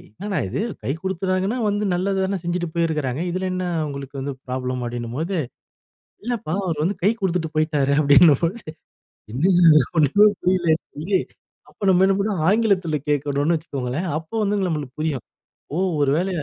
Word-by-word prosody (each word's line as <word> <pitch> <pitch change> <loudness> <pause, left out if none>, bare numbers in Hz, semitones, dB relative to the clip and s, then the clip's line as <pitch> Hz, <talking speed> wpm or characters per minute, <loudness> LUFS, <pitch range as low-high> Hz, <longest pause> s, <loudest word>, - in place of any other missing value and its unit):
'என்னடா 200 0 -3
இது - - -3 0.2
கை 135 - -1
குடுத்துறாங்கன்னா 190 +4 -1
வந்து 205 +1 0
நல்லது 190 +2 0
தான 195 -1 -2
செஞ்சுட்டு 175 0 -2
போயிருக்கிறாங்க. 155 -4 -1
இதுல 185 +2 -2
என்ன 185 0 -2
அ - - 0
உங்களுக்கு 140 -1 -7
வந்து 140 +1 -3
ப்ராப்ளம்.' 125 -1 -3
அப்படின்னும்போது. 120 +10 -3 0.9
"இல்லப்பா 230 -10 -3
அவரு 160 -4 -2
வந்து 185 +4 0
கை 205 - +4
குடுத்துட்டு 175 -4 0
போய்ட்டாரு." 150 -3 +1
அப்டின்னும்போது. 155 - +5 0.7
என்ன 140 +8 0 0.5
ஒன்னுமே 180 +8 +5
புரியலன்னு 175 -3 +2
சொல்லி. 180 +5 0 0.5
அப்ப - - -26
நம்ம 185 0 +5
என்ன 195 0 +3
பண்ண 205 +1 0 0.2
ஆங்கிலத்துல 195 -8 +2
கேட்கணும்னு 145 +3 +1
வச்சுக்கோங்களேன். 140 +2 -4
அப்போ 160 +7 -8
வந்து 205 +1 +1
நம்மளுக்கு 150 -5 -4
புரியும். 150 -6 -2 0.5
ஓ - - -1 0.2
ஒரு 140 -1 +3
வேள 185 +3 0
170 Hz, 150 wpm, -22 LUFS, 145-190 Hz, 0.9 s, அப்டின்னும்போது